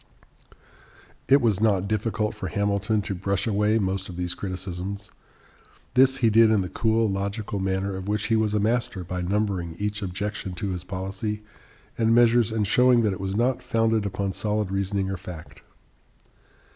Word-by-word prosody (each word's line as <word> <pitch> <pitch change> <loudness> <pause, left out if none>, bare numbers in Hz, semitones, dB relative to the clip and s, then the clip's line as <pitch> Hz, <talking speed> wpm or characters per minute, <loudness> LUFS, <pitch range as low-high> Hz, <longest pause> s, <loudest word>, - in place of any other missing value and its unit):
It 140 +1 +6
was 110 -4 +1
not 100 -4 +2
difficult 110 0 -1
for 95 - -5
Hamilton 100 +2 0
to 100 -1 -3
brush 95 +1 -1
away 105 0 +2
most 95 -2 -1
of 90 - -8
these 90 -1 -1
criticisms. 95 +1 -5 0.8
This 130 +1 +5
he 110 - +5
did 115 +1 +6
in 110 -3 +3
the 90 - -4
cool, 110 +2 +1
logical 100 +1 -3
manner 95 +1 -1
of 95 0 -6
which 105 -1 0
he 115 - +2
was 110 -1 +1
a - - +2
master 110 -3 0
by 90 +1 -4
numbering 95 -3 -1
each 105 +3 -3
objection 100 0 -4
to 100 +3 -3
his 90 -2 -4
policy 95 +3 -4 0.6
and 115 0 +3
measures 120 -1 +4
and 110 -2 0
showing 125 +3 +4
that 105 -3 +1
it 95 - -7
was 95 0 -3
not 125 +3 +1
founded 115 -2 +1
upon 100 0 -3
solid 105 -1 -1
reasoning 95 0 -1
or 95 - -3
fact. 90 -3 -10
100 Hz, 170 wpm, -25 LUFS, 95-110 Hz, 0.8 s, It